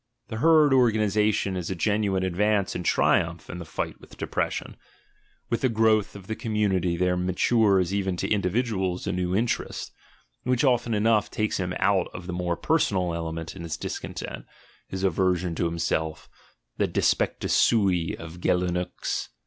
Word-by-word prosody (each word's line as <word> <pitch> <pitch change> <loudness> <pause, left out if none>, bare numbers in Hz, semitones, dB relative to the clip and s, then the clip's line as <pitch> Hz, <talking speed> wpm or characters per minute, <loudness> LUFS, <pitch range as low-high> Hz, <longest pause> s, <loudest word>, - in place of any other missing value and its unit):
The 110 - -4
herd 155 +1 +5
organisa 110 -4 +3
tion 100 -2 -1
is 90 -2 -3
a 95 - -2
genuine 100 0 +1
advance 100 +2 +1
and 90 - -4
triumph 85 -1 +1
in 90 - -6
the 85 - -7
fight 75 - -5
with - - -15
depression. - - -3 0.8
With 115 - 0
the 130 - +3
growth 110 -2 +2
of 100 -2 -10
the 110 - -4
community 95 -6 0
there 90 0 +2
matures 95 +1 +2
even 95 -2 -1
to - - -1
individuals 95 -2 0
a 100 - -1
new 90 0 -1
interest, 115 +3 -2 0.5
which 125 +2 +1
often 120 -4 +2
enough 105 0 +2
takes 110 0 -1
him 90 -1 -2
out 95 -2 +2
of 90 - -7
the 90 - -5
more 90 -1 -1
personal 95 - +1
element 80 0 -4
in 95 - -8
his 85 -2 -4
discontent, - - -6 0.4
his 95 0 -5
aversion 90 -2 +1
to 85 - -1
himself, 80 -1 -2 0.5
the - - +2
"despectus - - 0
sui" 95 -7 +2
of 80 +2 -10
Geulincx. 90 0 -1
95 Hz, 160 wpm, -26 LUFS, 90-110 Hz, 0.8 s, herd